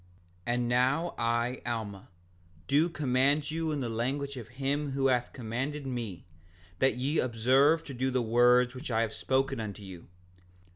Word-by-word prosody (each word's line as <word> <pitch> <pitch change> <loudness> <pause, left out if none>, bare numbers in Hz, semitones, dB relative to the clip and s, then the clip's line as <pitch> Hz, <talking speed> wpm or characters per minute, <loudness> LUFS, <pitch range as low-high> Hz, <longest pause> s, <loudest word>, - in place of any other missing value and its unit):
5:61 120 - +1
And 120 -1 0
now 130 +8 +1
I, 120 +2 0
Alma, 110 -5 -4 0.6
do 150 +5 +3
command 140 0 +1
you 160 0 -1
in 145 -2 -2
the 125 - -2
language 135 +5 -2
of 120 -4 -8
him 140 +3 -2
who 135 0 0
hath 125 -1 +1
commanded 135 +5 -4
me, 120 -8 -5 0.5
that 130 -1 +3
ye 140 +5 0
observe 130 +7 +3
to 140 - -8
do 130 +1 -1
the 130 0 +1
words 125 +2 +4
which 130 +2 -7
I 115 -1 +1
have 110 -1 -1
spoken 135 -2 0
unto 105 -2 -6
you. 95 -3 -10
130 Hz, 165 wpm, -30 LUFS, 120-140 Hz, 0.6 s, words